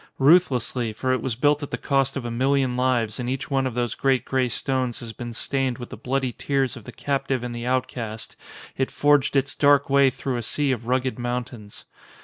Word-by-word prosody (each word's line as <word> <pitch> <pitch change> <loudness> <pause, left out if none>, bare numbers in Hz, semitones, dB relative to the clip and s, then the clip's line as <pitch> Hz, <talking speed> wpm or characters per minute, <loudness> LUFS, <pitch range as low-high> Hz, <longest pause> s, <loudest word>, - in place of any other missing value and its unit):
Ruthlessly, 135 -6 +3
for 130 +4 -1
it 130 - -1
was 130 -4 -2
built 145 +4 +2
at 145 - -5
the - - -3
cost 135 -1 0
of 130 - -5
a 120 - -3
million 130 +1 +1
lives 125 -3 +1
and 125 0 -2
each 130 +2 -4
one 135 -1 +2
of 125 - -5
those 120 -1 -1
great 130 -2 +1
grey 130 -2 +1
stones 130 -1 -1
has 115 -2 -8
been 120 0 -6
stained 130 +1 -1
with 120 - -9
the - - -5
bloody 130 -1 -2
tears 135 -1 0
of 120 -4 -11
the - - -8
captive 135 -3 -2
and 120 -1 -4
the 120 +1 -5
outcast, 125 -4 -3 0.4
it 130 - 0
forged 145 -1 +2
its 135 0 +2
dark 140 -1 +3
way 140 -1 +6
through 130 0 -3
a - - -2
sea 140 +5 0
of 120 -2 -3
rugged 130 0 0
mountains. 120 -3 -5
130 Hz, 215 wpm, -24 LUFS, 120-135 Hz, 0.4 s, way